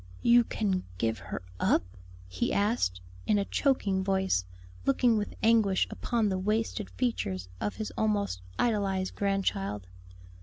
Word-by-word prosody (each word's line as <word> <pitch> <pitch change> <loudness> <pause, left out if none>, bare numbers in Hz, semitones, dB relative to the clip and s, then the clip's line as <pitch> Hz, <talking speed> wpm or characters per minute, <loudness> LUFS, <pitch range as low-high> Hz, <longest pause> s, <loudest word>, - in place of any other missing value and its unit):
"You 240 0 +6
can 195 -5 -1
give 110 +2 0
her - - -6 0.2
up?" - - +3 0.4
he 90 0 -1
asked, 200 - +1 0.3
in 210 - +4
a 200 - +1
choking 200 -10 +1
voice, 190 - +1 0.4
looking 230 - +3
with 210 -1 -2
anguish 220 -4 +4
upon 230 -3 0
the 190 -1 -1
wasted 215 +1 -1
features 95 - -2
of 105 +1 -2
his 215 - -4
almost 205 - 0 0.2
idolized 195 -4 0
grandchild. 105 - -1
195 Hz, 130 wpm, -29 LUFS, 135-220 Hz, 0.4 s, You